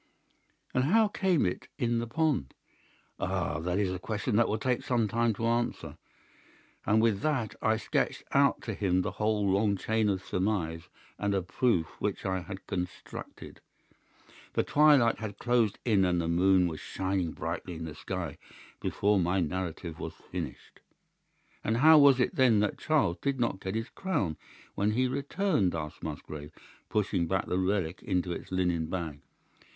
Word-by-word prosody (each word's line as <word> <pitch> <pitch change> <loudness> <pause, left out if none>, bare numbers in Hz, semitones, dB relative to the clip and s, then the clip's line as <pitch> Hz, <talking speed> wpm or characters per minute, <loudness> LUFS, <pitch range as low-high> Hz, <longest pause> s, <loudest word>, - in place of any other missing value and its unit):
"'And 130 +1 +2
how 215 +7 +4
came 190 -6 +2
it 90 - -3
in 120 -3 +1
the 115 - -3
pond?' 140 - 0 0.6
"'Ah, 75 - -1
that 90 +3 -1
is 100 -3 +1
a 95 - -3
question 105 +3 -2
that 120 +2 +4
will 110 - 0
take 125 +2 0
some 120 -3 +1
time 115 +2 +1
to 115 - -3
answer.' 120 +1 -1 0.9
And 110 +1 +4
with 110 -4 +2
that 135 -7 -1
I 110 0 +2
sketched - - -1
out - - +3
to - - -3
him 95 -2 +1
the 100 - -2
whole 105 -1 0
long 100 +1 +2
chain 110 +1 +1
of 95 -2 -1
surmise 90 -4 -1 0.3
and 100 -1 0
of 95 -2 -2
proof 115 -10 +2
which 100 -1 -2
I 95 -1 0
had 95 +2 -8
constructed. 90 0 -6 0.9
The - - +2
twilight 145 -6 +5
had 105 -2 -5
closed 120 -3 +1
in 105 -5 +4
and 90 -1 +2
the 85 - -1
moon 90 +2 +4
was 80 -3 -5
shining 95 -3 -2
brightly 85 +1 -4
in 80 0 -5
the 80 - -6
sky 85 -2 -5 0.4
before 100 0 +1
my 90 +2 +1
narrative 85 -1 -3
was - - -6
finished. 85 -7 -7 0.8
"'And 110 +2 +1
how 155 +4 +8
was 140 -2 +6
it 125 - +1
then 125 -5 +4
that 105 - -1
Charles 145 - +1
did 140 -2 -1
not 115 -5 0
get 95 +1 -4
his 115 +2 -2
crown 110 - -1 0.4
when 105 +2 +1
he 130 +3 +2
returned?' 140 - 0
asked 75 -2 -5
Musgrave, 75 -1 -7 0.4
pushing 95 -5 0
back 95 +2 0
the 90 - -1
relic 95 -1 -1
into 90 -2 -1
its 85 - -6
linen 90 -3 0
bag. 80 -5 -4
100 Hz, 170 wpm, -29 LUFS, 90-115 Hz, 0.9 s, how